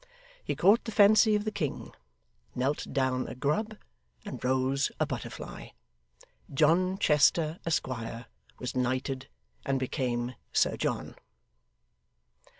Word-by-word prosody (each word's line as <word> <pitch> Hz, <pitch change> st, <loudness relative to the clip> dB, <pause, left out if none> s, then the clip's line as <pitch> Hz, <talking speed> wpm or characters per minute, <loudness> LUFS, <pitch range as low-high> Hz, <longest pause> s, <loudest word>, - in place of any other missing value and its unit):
He -, -, -2 dB
caught 205 Hz, +4 st, +4 dB
the 225 Hz, -, -4 dB
fancy 215 Hz, +1 st, +6 dB
of 210 Hz, 0 st, -1 dB
the 215 Hz, -, -1 dB
king, 150 Hz, -9 st, -4 dB, 0.6 s
knelt 135 Hz, +4 st, -1 dB
down 130 Hz, -2 st, 0 dB
a -, -, -7 dB
grub, 205 Hz, -, -1 dB, 0.5 s
and 205 Hz, -, -7 dB
rose 130 Hz, +2 st, +1 dB
a -, -, +3 dB
butterfly. -, -, -7 dB, 0.8 s
John 170 Hz, +6 st, +3 dB
Chester, 155 Hz, -1 st, +3 dB
Esquire, 120 Hz, -6 st, -2 dB, 0.3 s
was 125 Hz, -, -5 dB
knighted 130 Hz, +1 st, -1 dB, 0.4 s
and 135 Hz, -1 st, 0 dB
became 125 Hz, -2 st, -2 dB, 0.2 s
Sir -, -, +3 dB
John. -, -, -3 dB
140 Hz, 115 wpm, -29 LUFS, 130-185 Hz, 0.8 s, fancy